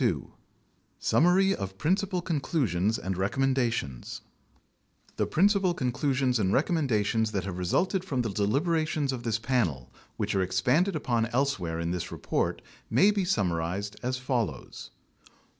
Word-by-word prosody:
2 - - 0 0.7
SUMMARY 185 +4 +3
OF 95 -1 -6
PRINCIPAL 185 - 0
CONCLUSIONS 115 - 0
AND 95 +1 -4
RECOMMENDATIONS 120 - -1 1.0
The - - +1
principal 190 0 +3
conclusions 130 -2 0
and 95 -2 +1
recommendations 115 - +1
that 95 -2 -1
have 90 -2 -5
resulted 180 - +1
from 135 -9 -1
the 110 - -2
deliberations 145 - 0
of 125 - -4
this 115 -2 0
Panel, 110 - -1 0.2
which - - -1
are 95 - +2
expanded 125 - +1
upon 120 -6 0
else 135 +1 0
where 80 -2 -3
in 85 0 -2
this 90 -1 -4
report, - - -2 0.3
may 200 +2 +5
be 200 -2 0
summarized 100 - -1
as 125 +1 -1
follows: 120 - -3 0.4
1. - - -24
125 Hz, 140 wpm, -28 LUFS, 95-155 Hz, 1.0 s, may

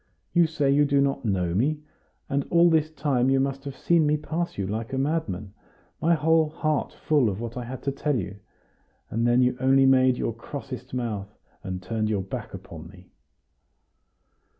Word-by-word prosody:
You 175 -2 +5
say 150 -4 +1
you 145 +1 +4
do 140 -1 +2
not 140 -2 0
know 90 -5 0
me? 140 - +1 0.5
And 140 0 -1
all 170 0 +5
this 155 -1 +2
time 140 -5 0
you 135 0 +3
must 135 +1 -2
have 140 -2 -6
seen 165 -3 +3
me 150 +1 +2
pass 165 +3 -3
you 100 - -1
like 110 +5 -4
a - - 0
madman, 130 - -2 0.5
my 170 +1 +4
whole 160 0 +3
heart 155 -1 -1
full 145 -7 +1
of 100 0 -4
what 115 0 -5
I 125 -1 -4
had 130 +1 -7
to 140 - 0
tell 145 +1 -1
you; 100 -4 -4 0.7
and 115 +2 +1
then 120 +1 +4
you 125 0 +2
only 135 +1 +4
made 130 -1 +4
your 115 - -1
crossest 130 +1 -7
mouth, 105 -4 -4 0.3
and 95 -2 -5
turned 110 +3 -1
your 100 -3 0
back 95 - -6
upon - - -9
me." - - -16
135 Hz, 190 wpm, -25 LUFS, 115-150 Hz, 0.7 s, You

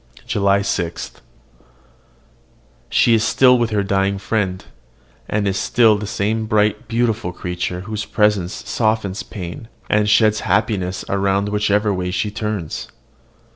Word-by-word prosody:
JULY 100 -1 +2
6. 85 -4 -3 1.8
She 120 - +4
is 110 -1 +3
still 125 +2 +4
with 120 -1 +1
her 105 -2 0
dying 100 0 0
friend, 95 -2 -2 0.6
and 105 -1 0
is 95 -1 0
still 115 -3 +4
the 105 0 -4
same 110 +2 -1
bright, 105 -1 +1
beautiful 115 -5 0
creature 90 0 -4
whose 105 +2 -4
presence 105 -4 0
softens 110 -3 0
pain, 95 +1 -8 0.2
and 105 0 +3
sheds 110 0 +4
happiness 95 -4 -1
around 100 +1 0
whichever 105 0 +1
way 90 -1 -2
she 95 +3 -1
turns. 105 -6 -4
105 Hz, 130 wpm, -19 LUFS, 95-110 Hz, 1.8 s, She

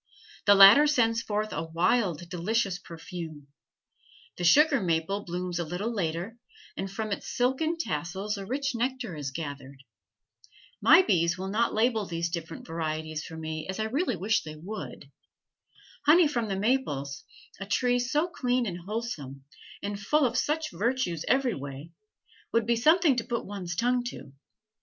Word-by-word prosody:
The 205 - +8
latter 200 +10 +9
sends 230 -5 +2
forth 215 0 -2
a 155 - -2
wild, 175 +1 0
delicious 190 +2 -1
perfume. 165 -3 -8 0.9
The 180 - -5
sugar 285 - +5
maple 175 +3 -1
blooms 175 0 -4
a - - 0
little 180 +8 -3
later, 180 +4 -3 0.4
and 195 - -4
from 215 +2 -4
its 200 - -4
silken 265 +7 0
tassels 190 - -3
a 200 - -6
rich 275 +3 -1
nectar 240 - -2
is 145 -2 -4
gathered. 140 -2 -7 1.0
My 375 - +7
bees 170 - +2
will 190 +1 -4
not 225 +4 +1
label 220 -2 +1
these 170 0 -2
different 165 -1 -6
varieties 155 -1 -3
for 160 - -9
me 155 -1 -5
as 190 - -4
I - - +1
really 250 - 0
wish 205 +5 +1
they 155 -1 -8
would. 190 +8 -8 1.0
Honey 325 +2 +7
from 240 -6 -1
the 195 -2 -2
maples, 190 - -1 0.4
a 200 - -6
tree 245 +4 +2
so 295 +7 +1
clean 250 -7 0
and 180 -4 -4
wholesome, 170 - -5 0.4
and 200 0 -3
full 290 +8 +2
of 245 - -1
such 310 +1 0
virtues 200 - -1
every 265 -3 +2
way, 140 +2 -8 0.6
would 230 -1 +2
be 235 +1 +2
something 310 +4 +4
to 235 - 0
put 235 0 -3
one's 185 -4 -5
tongue 245 +5 +1
to. 145 - -8
200 Hz, 160 wpm, -28 LUFS, 165-245 Hz, 1.0 s, latter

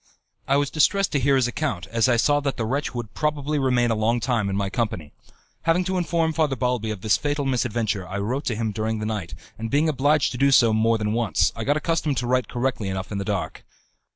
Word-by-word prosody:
I 140 - +3
was 145 -1 0
distressed 195 +5 +2
to 145 - +1
hear 135 +1 +3
his 130 -2 +2
account, 125 - -3
as 115 +2 +2
I 120 - +3
saw 145 +5 +3
that 140 -2 -2
the 115 - -1
wretch 135 +4 -2
would 120 -3 -5
probably 150 -1 -1
remain 125 -3 +2
a - - +1
long 115 +3 +1
time 115 -5 0
in 95 - -2
my 100 0 0
company. 95 -8 -3 0.5
Having 165 +2 +3
to 185 +1 -2
inform 165 -2 0
Father 155 -4 +1
Balbi 125 -3 -1
of 105 -3 -5
this 105 -1 +3
fatal 145 -1 -2
misadventure, 115 -6 -1
I 100 - -5
wrote 120 +8 -2
to 120 - -1
him 110 0 -2
during 110 +1 -2
the 105 - -4
night, 105 -6 -4 0.2
and 115 0 -4
being 145 +5 +2
obliged 145 0 +2
to 125 - -6
do 140 - +4
so 120 -4 +5
more 115 +1 +2
than 105 -1 -1
once, 115 -8 +1
I - - -4
got 145 +2 +2
accustomed 155 -3 -1
to 120 - -1
write 125 +1 +1
correctly 120 -5 -2
enough 95 +1 -4
in 100 - -2
the - - -2
dark. - - -3
120 Hz, 240 wpm, -24 LUFS, 110-145 Hz, 0.5 s, so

